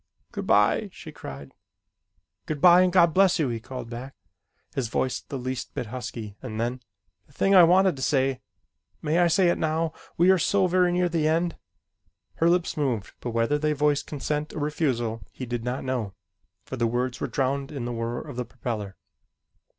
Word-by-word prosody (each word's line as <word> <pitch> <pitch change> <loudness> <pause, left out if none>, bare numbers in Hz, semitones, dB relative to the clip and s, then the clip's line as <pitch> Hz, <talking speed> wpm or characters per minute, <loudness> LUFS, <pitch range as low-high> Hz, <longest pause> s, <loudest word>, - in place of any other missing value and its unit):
"Good - - -5
bye!" 105 - +3
she 160 - -10
cried. 70 - -9 0.9
"Good 155 -2 -3
bye, 175 +3 +7
and 185 0 +3
God 170 -3 +5
bless 190 0 +4
you!" 150 -5 +1
he 115 -1 -3
called 120 0 -8
back 130 +3 -7 0.6
his 130 -4 -1
voice 130 +3 -1
the 140 - -6
least 130 0 -5
bit - - -2
husky 115 -4 -6
and 110 -4 -6
then: 120 +2 -2 0.5
"The - - -24
thing 195 - +2
I 185 - +9
wanted 185 +1 +5
to - - -7
say 135 -2 +1 0.6
may 155 +3 +1
I 175 - +5
say 180 +1 +3
it - - 0
now, 160 0 0 0.2
we 175 +3 +6
are 190 - +4
so 195 +2 +2
very 180 0 +3
near 180 0 +2
the 165 -3 0
end?" 165 +2 +1 0.8
Her 165 - +3
lips 175 0 +1
moved 125 -9 -2
but 125 - -4
whether 115 +5 +1
they 150 0 +1
voiced 145 0 +1
consent 150 +1 -3
or - - -3
refusal 130 -7 -1
he 130 - -7
did 120 -1 -4
not 125 +2 -3
know, 120 -7 -3 0.5
for 130 - -6
the 120 -1 +1
words 125 +2 -2
were - - -1
drowned 135 0 -1
in 135 -5 -4
the 120 - -3
whir 115 +1 -3
of 145 -5 -9
the 125 - -2
propeller. 105 -5 -5
135 Hz, 195 wpm, -26 LUFS, 120-165 Hz, 0.9 s, I